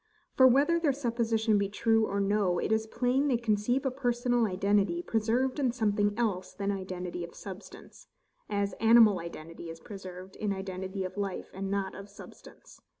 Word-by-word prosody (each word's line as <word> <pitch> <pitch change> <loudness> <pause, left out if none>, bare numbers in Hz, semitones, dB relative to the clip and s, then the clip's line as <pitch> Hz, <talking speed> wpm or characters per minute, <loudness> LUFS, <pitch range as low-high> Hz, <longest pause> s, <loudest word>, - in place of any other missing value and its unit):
For, 260 - +7
whether 285 +7 +4
their 305 -5 +2
supposition 230 -4 +1
be 200 -1 0
true 225 +1 +2
or 200 - -2
no, 200 -3 +1
it - - -1
is 220 0 +1
plain 255 +5 +1
they 255 -4 +2
conceive 235 +3 0
personal 245 -2 +1
identity 195 -2 +1
preserved 235 +6 0
in 260 -4 +2
something 205 -3 0
else 200 -6 -1
than 200 0 -2
identity 185 -2 -5
of 170 - -9
substance; 195 0 -11 0.4
as 200 -1 -1
animal 225 -4 +6
identity 165 0 -8
is 165 0 -8
preserved 185 -1 -10
in 210 -2 -1
identity 190 0 -5
of 185 +2 -6
life, 200 -2 -4
and 195 +1 -4
not 195 -1 -2
of 200 +1 -10
substance. 205 - -14
205 Hz, 165 wpm, -29 LUFS, 190-235 Hz, 0.4 s, For